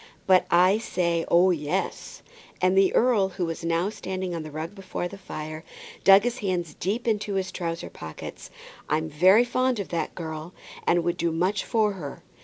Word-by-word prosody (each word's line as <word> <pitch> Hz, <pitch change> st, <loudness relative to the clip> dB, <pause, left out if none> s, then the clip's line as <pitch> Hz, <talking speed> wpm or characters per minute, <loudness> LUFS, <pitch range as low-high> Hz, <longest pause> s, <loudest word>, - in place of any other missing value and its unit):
"But 185 Hz, -1 st, +4 dB
I 185 Hz, +4 st, +5 dB
say, 170 Hz, -6 st, -1 dB
oh, 180 Hz, +2 st, +5 dB
yes;" 150 Hz, -3 st, -3 dB, 0.4 s
and 185 Hz, +1 st, +3 dB
the 195 Hz, -1 st, +5 dB
earl, 225 Hz, -6 st, +3 dB
who 180 Hz, -1 st, -3 dB
was 165 Hz, 0 st, -5 dB
now 170 Hz, +4 st, 0 dB
standing 185 Hz, -3 st, -4 dB
on 165 Hz, -, -3 dB
the 155 Hz, -, -7 dB
rug 155 Hz, +4 st, -6 dB
before 190 Hz, -3 st, -4 dB
the 200 Hz, -, -10 dB
fire, 155 Hz, -4 st, -7 dB, 0.4 s
dug 195 Hz, +1 st, +8 dB
his 245 Hz, +1 st, -2 dB
hands 175 Hz, -5 st, -2 dB
deep 205 Hz, +10 st, -2 dB
down 230 Hz, -, +2 dB
into 210 Hz, -1 st, -2 dB
his 190 Hz, -1 st, -1 dB
trousers' 165 Hz, -2 st, -4 dB
pockets. 80 Hz, -1 st, -9 dB, 0.4 s
"I'm 160 Hz, +1 st, 0 dB
very 185 Hz, +9 st, +6 dB
fond 255 Hz, -1 st, 0 dB
of 200 Hz, -, -4 dB
that 170 Hz, -1 st, -3 dB
girl, 160 Hz, 0 st, -6 dB, 0.3 s
and 175 Hz, 0 st, +3 dB
would 175 Hz, 0 st, -1 dB
do 170 Hz, 0 st, 0 dB
much 185 Hz, +5 st, 0 dB
for 215 Hz, -2 st, +1 dB
her. 150 Hz, -8 st, -8 dB
180 Hz, 190 wpm, -26 LUFS, 165-195 Hz, 0.4 s, dug